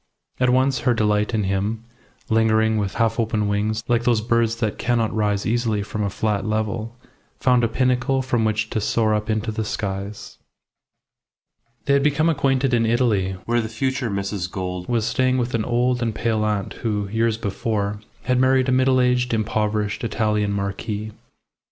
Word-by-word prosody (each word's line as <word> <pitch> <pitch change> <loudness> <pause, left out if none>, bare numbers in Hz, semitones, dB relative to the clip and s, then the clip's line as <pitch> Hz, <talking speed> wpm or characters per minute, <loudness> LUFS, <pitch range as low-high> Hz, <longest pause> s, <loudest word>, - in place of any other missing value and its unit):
And 125 0 +3
at - - +3
once 130 0 +2
her 125 - +2
delight 105 -1 +1
in 105 - +1
him, 100 +4 -1 0.4
lingering 110 -1 +3
with 100 -2 -2
half 115 0 +1
open 110 -2 0
wings 105 +2 -1
like 120 -1 +2
those 120 -2 +3
birds 115 0 +1
that 110 -3 -2
cannot 120 -3 0
rise 105 -2 0
easily 110 -2 0
from 105 +1 -4
a 100 - 0
flat 105 0 -1
level, 110 +1 -2 0.4
found 125 -2 +3
a - - +4
pinnacle 130 +2 +1
from 120 -3 0
which 110 0 0
to 110 - -1
soar 110 +1 +1
up 105 +1 -2
into 110 +1 -1
the 110 +1 -2
skies. 100 -1 -5 1.5
They 140 - +2
had 140 - +4
become 150 +3 +2
acquainted 135 -4 +1
in 115 -1 +3
Italy, 110 -5 +1
where 120 0 +1
the 110 - -5
future 130 +2 -1
Mrs. 100 -2 -3
Gould 90 -2 -4
was 115 -3 +1
staying 130 0 +1
with 125 -1 -1
an 115 -2 0
old 125 +1 +1
and 115 -2 -1
pale 110 -2 0
aunt 105 -2 -1
who, 105 -3 -1
years 110 +1 +1
before, 105 -1 -2 0.2
had 125 -1 +1
married 130 0 +3
a - - +3
middle 130 0 +3
aged, 125 -1 +2
impoverished 105 -1 -1
Italian 105 -2 0
marquis. 100 +2 -3
110 Hz, 175 wpm, -22 LUFS, 105-120 Hz, 1.5 s, a